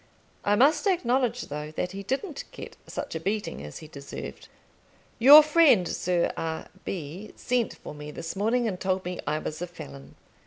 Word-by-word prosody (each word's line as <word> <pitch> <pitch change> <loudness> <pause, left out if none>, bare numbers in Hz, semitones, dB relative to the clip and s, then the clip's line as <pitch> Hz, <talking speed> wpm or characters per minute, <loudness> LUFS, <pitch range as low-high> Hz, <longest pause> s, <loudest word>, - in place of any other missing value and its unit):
I 205 - +3
must 285 - +4
acknowledge, 250 - +1
though, 150 +1 -5
that 180 +3 -2
he 195 +1 -6
didn't 275 - -3
get - - -9
such 285 - -5
a 160 - -3
beating 200 - -2
as 75 0 -8
he - - -11
deserved. 140 -2 -8 0.7
Your 285 +6 +11
friend 295 - +5
Sir 175 -1 0
R. 160 -1 -4 0.2
B. 180 +4 -6
sent 245 -2 -1
for - - -9
me 150 0 -8
this 165 +4 -6
morning, 230 +4 +1
and 185 -4 -3
told 185 -1 -1
me 180 0 -4
I 150 +1 +1
was 155 +1 -5
a 180 - -2
felon. 70 - -11
190 Hz, 180 wpm, -27 LUFS, 155-245 Hz, 0.7 s, Your